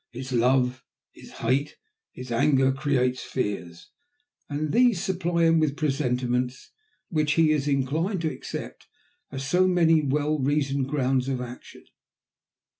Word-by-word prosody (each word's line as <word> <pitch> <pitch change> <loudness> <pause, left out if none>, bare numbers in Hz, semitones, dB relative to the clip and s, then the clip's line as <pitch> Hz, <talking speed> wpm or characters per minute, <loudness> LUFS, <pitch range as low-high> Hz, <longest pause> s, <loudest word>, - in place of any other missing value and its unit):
His 130 +2 -8
love, 125 +1 +2 0.3
his - - -14 0.2
hate, 140 +5 0 0.3
his 125 -1 -9
anger 135 +2 +3
create 130 -2 0
fears, 90 -8 -5 0.6
and 150 +1 -2
these 240 -6 +4
supply 175 -2 -1
him 165 0 +4
with 150 -2 0
presentiments 125 -4 -1 0.4
which 155 -3 +1
he 160 -1 +4
is 150 -2 0
inclined 155 +8 0
to 160 -3 -1
accept - - -8 0.4
as 135 0 -5
so 180 +5 +3
many 165 -3 +4
well 150 +2 0
reasoned 140 -1 0
grounds 135 -2 0
of 130 -2 -1
action. 125 0 -9
140 Hz, 130 wpm, -25 LUFS, 130-155 Hz, 0.6 s, these